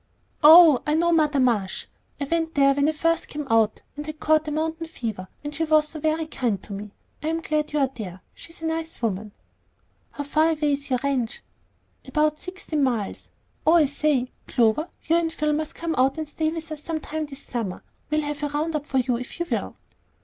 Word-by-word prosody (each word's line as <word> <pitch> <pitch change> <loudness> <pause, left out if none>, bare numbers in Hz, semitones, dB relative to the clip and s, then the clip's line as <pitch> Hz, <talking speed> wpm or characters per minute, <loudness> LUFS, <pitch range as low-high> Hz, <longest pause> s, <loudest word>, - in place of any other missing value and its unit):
"Oh, 315 -3 +9
I 300 - +2
know 340 +2 +3
Mother 305 -3 +3
Marsh. 225 -7 +1 0.3
I - - -1
went 325 +2 -1
there 275 -1 +5
when 285 +2 +2
I - - +3
first 330 +2 0
came 300 0 -5
out, 225 -1 +3
and 295 - -5
had 310 0 -7
caught 310 0 +3
the 305 - -3
mountain 320 +2 -2
fever, 220 - -5 0.2
and 290 0 -5
she 320 +2 -1
was 310 0 +2
ever 310 0 +1
so 320 - -3
kind 240 - -2
to 205 - -8
me. 205 +1 -6 0.3
I'm 320 +2 -1
glad 305 -2 -1
you 300 - -1
are 275 -2 +3
there. 185 -5 -7
She's 330 0 -13
a - - -1
nice 320 0 -3
woman." 210 -1 -1 0.8
"How 290 - -4
far 310 +3 +2
away 300 -1 0
is 280 0 -3
your 255 - +2
ranch?" 260 -5 -1 0.6
"About 305 -1 +1
sixteen 365 -5 -4
miles. 235 -7 -1 0.4
Oh, 320 - +7
I 335 -3 +6
say, 280 -3 0 0.2
Clover, 240 +7 +2 0.2
you 330 +2 +3
and 330 -1 0
Phil 305 -1 0
must 310 0 -3
come 335 -1 -2
out 265 +4 +3
and 315 -1 -3
stay 310 +1 -1
with 320 -1 -6
us 305 -1 -6
sometime 315 -1 -4
this 275 -1 -10
summer. 225 -7 -4 0.3
We'll 305 +1 +1
have 295 0 -4
a 295 - 0
round 305 +3 -2
up 295 -1 -3
for 265 - -1
you 250 -2 +1
if 250 +7 -8
you 345 - 0
will." - - -2
300 Hz, 215 wpm, -24 LUFS, 265-315 Hz, 0.8 s, Oh